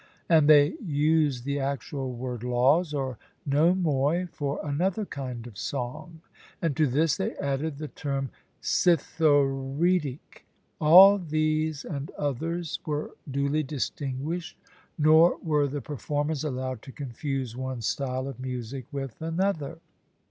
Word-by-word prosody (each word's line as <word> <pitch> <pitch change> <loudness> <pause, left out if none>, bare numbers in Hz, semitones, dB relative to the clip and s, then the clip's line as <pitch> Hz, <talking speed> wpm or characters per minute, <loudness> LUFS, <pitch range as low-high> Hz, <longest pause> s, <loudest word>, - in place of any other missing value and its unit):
And 155 -3 +5
they 145 -1 +7
used 150 - +1
the 140 0 -1
actual 135 0 -3
word 125 -1 -5
'laws,' 135 +7 +3
or 135 -5 -3 0.3
nomoi, 160 +1 +2
for 140 -1 -3
another 180 +8 0
kind 125 -7 -6
of 115 -5 -10
song; 155 +5 -5 0.4
and 165 -5 -1
to 155 0 +3
this 145 +4 +2
they - - -2
added 140 +2 -2
the 155 +1 -5
term 135 -3 -3 0.3
'citharoedic.' 145 -1 +1 0.4
All 190 +6 +8
these 155 -2 -1
and 145 -3 -5
others 160 +4 -2
were 150 -1 -3 0.2
duly 140 +3 0
distinguished, 145 +3 -4 0.4
nor 160 +2 +5
were 150 -3 +2
the 145 +1 -4
performers 145 +1 -2
allowed 130 -4 -3
to 135 - -11
confuse 135 -2 -4
one 130 -1 -4
style 130 +1 -2
of 135 -3 -7
music 130 0 -5
with 135 -3 -6
another. 165 -2 -1
145 Hz, 125 wpm, -27 LUFS, 135-160 Hz, 0.4 s, All